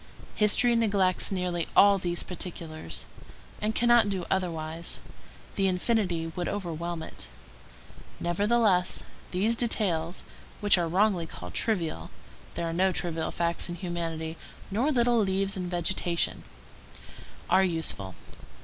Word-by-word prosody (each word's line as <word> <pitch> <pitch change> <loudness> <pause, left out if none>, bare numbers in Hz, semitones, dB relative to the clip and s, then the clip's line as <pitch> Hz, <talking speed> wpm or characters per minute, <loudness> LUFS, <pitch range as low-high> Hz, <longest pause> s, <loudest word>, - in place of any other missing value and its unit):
History 225 +3 +3
neglects 200 -6 +2
nearly 180 -3 -1
all 200 -1 +7
these 175 -1 -1
particulars, 165 - -4 0.6
and 215 +1 0
cannot 240 -3 +5
do 190 -3 -2
otherwise; 165 -3 -2 0.6
the 195 - +2
infinity 180 -3 0
would 175 -1 -2
overwhelm 170 -3 -3
it. - - -10 0.9
Nevertheless, 200 +1 +2 0.3
these 205 +6 +1
details, 185 -8 0 0.4
which 205 -1 +5
are 175 -2 0
wrongly 185 -1 +2
called 90 - -9
trivial,—there 170 - -3
are 165 - -2
no 190 +2 +3
trivial 165 -3 -1
facts 170 +1 -1
in 175 - -3
humanity, 165 -2 -4 0.3
nor 240 +10 +2
little 240 -3 +3
leaves 195 -1 +1
in 180 -2 -3
vegetation,—are 170 - -2
useful. 160 - -1
180 Hz, 115 wpm, -28 LUFS, 165-205 Hz, 0.9 s, all